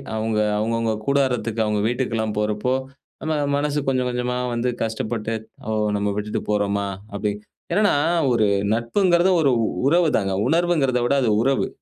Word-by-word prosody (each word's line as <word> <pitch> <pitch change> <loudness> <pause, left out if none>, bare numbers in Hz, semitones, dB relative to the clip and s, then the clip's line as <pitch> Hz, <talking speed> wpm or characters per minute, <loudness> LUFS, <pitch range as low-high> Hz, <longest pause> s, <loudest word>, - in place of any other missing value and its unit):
அவுங்க 110 0 -1 0.2
அவங்கவுங்க 115 +1 0
கூடாரத்துக்கு, 125 -5 0
அவுங்க 105 -1 0
வீட்டுக்கெல்லாம் 115 -3 -1
போறப்போ, 105 +4 0 0.5
நம்ம 155 - -1 0.2
மனசு 145 0 0
கொஞ்சம் 130 -1 0
கொஞ்சமா 125 0 -2 0.2
வந்து 120 +1 0
கஷ்டப்பட்டு 110 0 -3 0.3
"ஓ! - - -1 0.3
நம்ம 100 0 -1
விட்டுட்டு 105 0 -2
போறம்மா!" 100 -1 0 0.3
அப்பிடி 105 0 -1 0.4
என்னென்னா, 205 -4 +3 0.4
ஒரு 110 -3 +3 0.3
நட்புங்கிறது 175 - +2
ஒரு 140 -3 +3
உ - - +2 0.2
உறவுதாங்க. 150 - +2 0.2
உணர்வுங்கிறத 160 -7 +2
விட 140 - +2
அது 120 - +2
உறவு. 135 +1 +1
120 Hz, 135 wpm, -22 LUFS, 110-140 Hz, 0.5 s, என்னென்னா